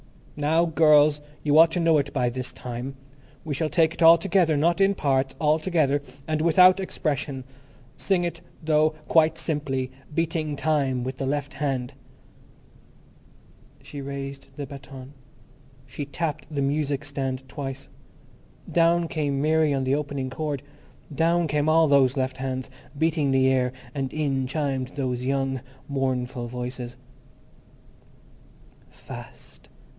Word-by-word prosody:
Now, 160 +3 +2
girls, 150 -2 +4 0.2
you 150 +1 +4
ought 165 0 +8
to - - 0
know 165 -2 +4
it 140 0 -3
by 125 -3 +1
this 130 +1 -4
time. 125 +2 -6 0.5
We 155 - -2
shall 155 +2 -1
take 160 +2 +3
it - - -10
all 165 +1 +9
together; 170 -3 +2
not 170 +5 +2
in 195 +1 +4
parts, 135 -4 0
all 155 0 +2
together. 155 -5 +1 0.3
And 155 -1 0
without 180 +3 +6
expression. 145 -7 -2 0.5
Sing 185 -3 0
it, 170 -1 -4 0.2
though, 155 0 +2
quite 160 0 +4
simply, 135 -5 -2 0.2
beating 155 -1 -1
time 140 -5 0
with 130 +1 -4
the 135 - -3
left 145 0 -2
hand." 135 -3 -2 1.9
She 145 - -8
raised 140 0 -6
the 145 - -5
baton; 135 0 -11 0.7
she 135 +3 -6
tapped 150 0 -4
the 145 -3 -1
music 145 0 -1
stand 135 -2 -4
twice. 135 -2 -6 0.8
Down 170 0 +3
came 145 -4 -1
Mary 155 +1 +3
on 135 -1 0
the 130 +1 +1
opening 140 -3 -2
chord; 145 -1 -3 0.5
down 165 +3 +2
came 150 0 +1
all 160 0 +5
those 140 -2 +4
left 130 0 -1
hands, 130 -1 -4 0.3
beating 160 -2 +1
the 130 0 +4
air, 125 -1 +1 0.2
and 135 -2 -3
in 135 -4 -1
chimed 135 -3 -1
those 125 -3 -2
young, 135 -1 -1 0.3
mournful 130 -3 -2
voices:— 125 0 -6 1.9
Fast! - - -12
145 Hz, 140 wpm, -25 LUFS, 135-155 Hz, 1.9 s, all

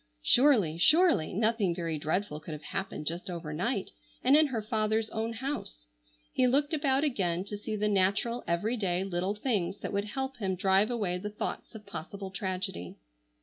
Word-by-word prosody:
Surely, 215 - +4
surely, 325 - +4
nothing 215 -3 +1
very 165 -3 -2
dreadful 155 +1 -1
could 155 +1 -8
have 150 0 -8
happened 190 -2 -4
just 170 +4 -3
over 165 -4 -5
night, 195 +5 -1 0.3
and 265 +3 +6
in 310 0 +6
her 235 -6 -3
father's 215 0 0
own 225 +1 -2
house. 225 - -5 0.5
He 255 - +3
looked 285 +5 +2
about 280 -2 +2
again 185 - 0
to 205 +1 -6
see 210 +1 -4
the 210 0 0
natural, 205 +4 +1
every 210 +8 0
day, 185 -3 0
little 190 +1 -1
things 210 -5 -1
that - - -4
would 200 +1 0
help 265 +4 -4
him 190 -4 -1
drive 190 +3 +4
away 200 -7 -1
the 210 +3 -4
thoughts 210 +2 -5
of 210 -1 -10
possible 190 +4 -7
tragedy. 185 - -4
200 Hz, 180 wpm, -30 LUFS, 180-235 Hz, 0.5 s, and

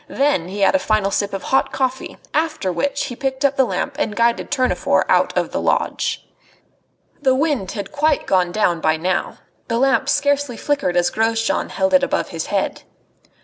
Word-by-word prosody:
Then 275 - +1
he 200 +2 -5
had 195 - +4
a 285 - +3
final 215 -6 +1
sip 200 0 -1
of 195 -1 -5
hot 265 - +1
coffee; 260 -1 -2 0.2
after 310 - 0
which 280 +10 -1
he 255 -3 -6
picked 265 +2 -2
up 280 0 +2
the 265 - +3
lamp 275 +3 -3
and 220 -8 -1
guided 235 0 +1
Tournefort 255 -3 +1
out - - +3
of - - 0
the - - -2
lodge. - - -1 1.0
The 260 -2 +3
wind 270 -10 0
had 200 -3 -6
quite 300 0 +1
gone 180 -2 +2
down 175 -5 +1
by 155 0 +2
now. 180 +3 -2 0.3
The 230 - -1
lamp 270 +2 +2
scarcely 285 -3 +1
flickered 280 -12 -1
as 175 0 +2
Grosjean 225 0 0
held 285 0 -1
it 275 - +6
above 275 - -1
his - - -5
head. - - -1
255 Hz, 190 wpm, -20 LUFS, 200-280 Hz, 1.0 s, it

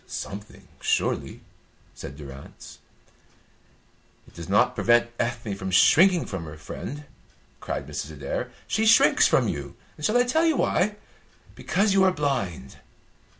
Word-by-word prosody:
"Something, 105 +1 -8
surely," - - -1 0.5
said 70 - -9
Durrance. 70 -2 -12 1.5
"It - - -19
does - - -9
not - - +3
prevent 120 0 +2
Ethne 115 -3 -2
from 95 -1 -5
shrinking 170 - +5
from 95 -4 -6
her 75 0 -9
friend," 140 - -7 0.6
cried - - -4
Mrs. 80 - -5
Adair. 70 -2 -4 0.2
"She 220 +2 +1
shrinks 230 - +6
from - - +2
you. - - -5 0.2
Shall 215 +3 +1
I 245 - +5
tell 260 +7 +1
you 320 -4 +2
why? 210 +3 +1 0.6
Because 200 0 0
you 195 -1 +4
are 190 - +4
blind. 130 - -3
120 Hz, 135 wpm, -25 LUFS, -, 1.5 s, shrinks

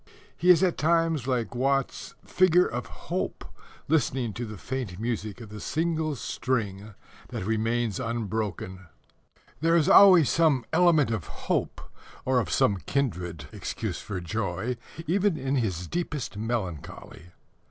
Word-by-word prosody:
He 175 +4 +1
is 180 0 +7
at 180 -2 +1
times 165 -4 +2
like 125 -4 -1
Watts's 135 +2 -1
figure 180 -1 +4
of 120 +1 -4
Hope - - -4 0.4
listening 130 -7 +1
to 120 +3 -5
the 105 -1 -8
faint 120 -6 -4
music 110 -3 -3
of 115 -3 -10
the 105 0 -8
single 160 +2 -1
string 110 -5 -3 0.3
that - - -5
remains 110 0 0
unbroken. 105 -5 -3 0.7
There 165 +2 +3
is 160 -3 +3
always 185 -7 +8
some 150 -7 +3
element 165 -8 +4
of 105 -8 -3 0.2
hope, - - -1 0.4
or 130 -1 +3
of 105 -10 -2
some 100 +5 +3
kindred 90 - -2
excuse - - -4
for 100 -3 -5
joy, 95 +5 -3 0.3
even 185 +1 +1
in 135 0 -1
his 95 -8 -1
deepest 150 - -3
melancholy. 95 -6 -5
120 Hz, 135 wpm, -27 LUFS, 105-155 Hz, 0.7 s, always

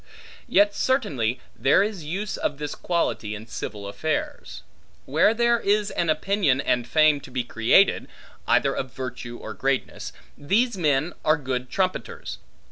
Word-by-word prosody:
Yet 205 -3 +4
certainly, 135 - 0 0.2
there 135 - +4
is 205 -5 -4
use 195 +8 -3
of 145 - -2
this 150 0 -4
quality 140 -11 -1
in 110 +1 -9
civil 105 -3 -6
affairs. 100 - -4 0.4
Where 160 +9 +4
there 235 +1 +2
is 205 0 +1
an 170 - -1
opinion 155 -3 +2
and 125 -3 0
fame 155 -1 +4
to 145 - -12
be 125 -1 -2
created, 120 - +3 0.4
either - - +3
of 130 - -4
virtue 125 -2 -6
or 110 - -7
greatness, 135 +6 -2 0.2
these 215 - +1
men 155 -2 +1
are 155 +1 +3
good 130 -3 -3
trumpeters. 185 +3 -3
150 Hz, 145 wpm, -24 LUFS, 125-195 Hz, 0.4 s, Yet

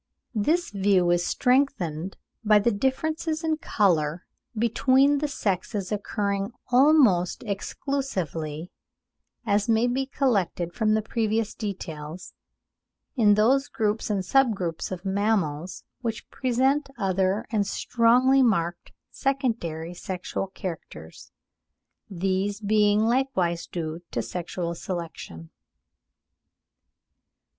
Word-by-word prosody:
This 310 +11 +1
view 195 -3 +2
is 175 0 +2
strengthened 195 - 0 0.3
by 215 -1 +5
the 210 +3 +2
differences 310 +8 -1
in 320 -1 +1
colour 175 - +1 0.3
between 260 +5 +3
the 300 - 0
sexes 200 -5 -2
occurring 200 0 -2 0.2
almost 250 - +4
exclusively, 185 - -3 0.7
as 205 0 +1
may 225 +1 +3
be 260 +2 0
collected 195 - 0
from 215 0 +2
the 220 - 0
previous 220 -1 -1
details, 175 -5 -6 0.8
in 210 -5 +5
those 260 +6 +3
groups 220 -2 -1
and 195 -3 -1
sub 260 +1 +3
groups 170 -3 -4
of 185 +1 -6
mammals 190 -5 -1 0.2
which 230 -4 -5
present 265 +3 +1
other 195 0 0
and 205 -3 +1
strongly 250 +5 +3
marked 175 -8 0 0.2
secondary 220 - -2
sexual 180 +2 -4
characters; 165 - -8 0.8
these 195 +2 -1
being 210 0 +3
likewise 220 -8 0
due 165 -1 -5
to - - -2
sexual 175 -1 -4
selection. 165 - -7
205 Hz, 100 wpm, -25 LUFS, 180-245 Hz, 0.8 s, by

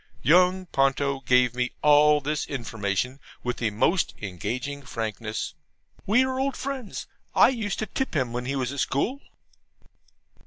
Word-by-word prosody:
Young 180 +3 +4
Ponto 135 -2 +1
gave 125 -1 +3
me 125 0 -1
all 150 0 +6
this 150 +1 -2
information 115 0 -2 0.2
with 125 0 -2
the 115 - 0
most 165 - +1
engaging 120 +9 -4
frankness. 110 -3 -4 0.5
We 230 +6 +5
are 260 0 -2
old 270 0 -1
friends. 265 -5 -5 0.3
I - - +7
used 225 -6 -2
to 220 - -2
tip 265 - -3
him 130 -5 0
when 125 0 -3
he 135 +2 -2
was 130 -2 -1
at 140 - -5
school. 235 - 0
140 Hz, 150 wpm, -26 LUFS, 125-185 Hz, 0.5 s, I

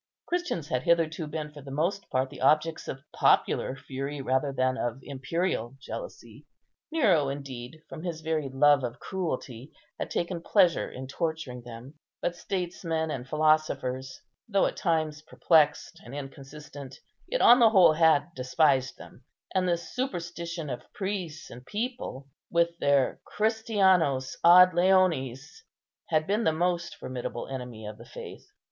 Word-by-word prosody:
Christians 345 - -2
had 125 - 0
hitherto 165 0 +1
been 150 0 -5
for 150 -1 -11
the 140 - -10
most 170 +8 -2
part 130 +1 0
the 140 - -10
objects 155 +4 +2
of 135 +1 -6
popular 130 - +2
fury 135 +2 -5
rather 130 +1 0
than 130 -1 +1
of 120 -2 -2
imperial 135 -2 -2
jealousy. - - -9 0.4
Nero, 190 - +3
indeed, 140 +1 -7
from 155 - -8
his 165 -2 -4
very 155 -3 -1
love 140 +1 +4
of 120 -1 -4
cruelty, 135 -8 -4 0.3
had - - -3
taken 175 0 -2
pleasure 180 -1 +3
in 130 - -7
torturing 145 -3 -4
them: 120 +5 -11 0.2
but 175 - -2
statesmen 170 -3 -3
and 130 -1 -5
philosophers, 150 -4 +1 0.3
though 200 -2 +3
at - - -1
times 155 -3 0
perplexed 155 -1 +2
and 120 +4 -9
inconsistent, 140 0 -9 0.3
yet - - -1
on 245 +2 +8
the 230 -2 +7
whole 190 -7 +6
had 160 0 +3
despised 130 -1 +1
them; - - -14 0.3
and 185 -1 +1
the 170 - +2
superstition 170 - -4
of 125 - -8
priests 190 -6 -4
and 125 +1 -10
people, 215 - -4 0.2
with 170 0 +2
their 140 -2 +2
"Christianos 190 - +2
ad 180 +1 +8
leones," 175 - +1 0.5
had 155 -1 +2
been 210 +5 0
the 160 - +3
most 175 +1 -1
formidable 125 -2 -5
enemy 125 -5 -7
of 105 0 -8
the - - -11
faith. - - -10
155 Hz, 145 wpm, -28 LUFS, 135-175 Hz, 0.5 s, on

